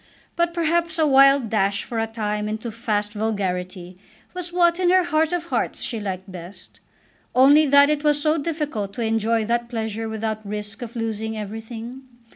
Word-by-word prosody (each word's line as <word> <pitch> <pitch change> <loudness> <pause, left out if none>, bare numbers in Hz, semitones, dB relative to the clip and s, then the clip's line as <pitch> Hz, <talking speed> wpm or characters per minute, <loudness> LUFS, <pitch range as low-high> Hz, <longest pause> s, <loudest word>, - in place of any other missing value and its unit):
But 340 0 +1
perhaps 335 0 0
a 315 - +3
wild 275 -3 +5
dash 200 -2 +1
for 230 - -4
a 225 - 0
time 210 -1 -3
into 220 +2 -4
fast 210 -2 -2
vulgarity 185 -4 -3 0.3
was 360 -1 -4
what 345 0 +3
in 360 -1 +2
her 370 0 +5
heart 320 -1 +1
of 350 -1 -1
hearts - - 0
she 230 - -3
liked 190 -2 -5
best, 180 +2 -10 0.6
only 285 +4 +6
that 280 +1 +6
it 300 0 -1
was 295 -1 +3
so 310 +2 +1
difficult 290 -10 -3
to 235 - -3
enjoy 225 0 +1
that 235 +1 -1
pleasure 225 -1 -3
without 220 0 -3
risk 210 0 -5
of 240 -1 -7
losing 220 -1 -3
everything. 225 +4 -7
225 Hz, 175 wpm, -22 LUFS, 210-295 Hz, 0.6 s, only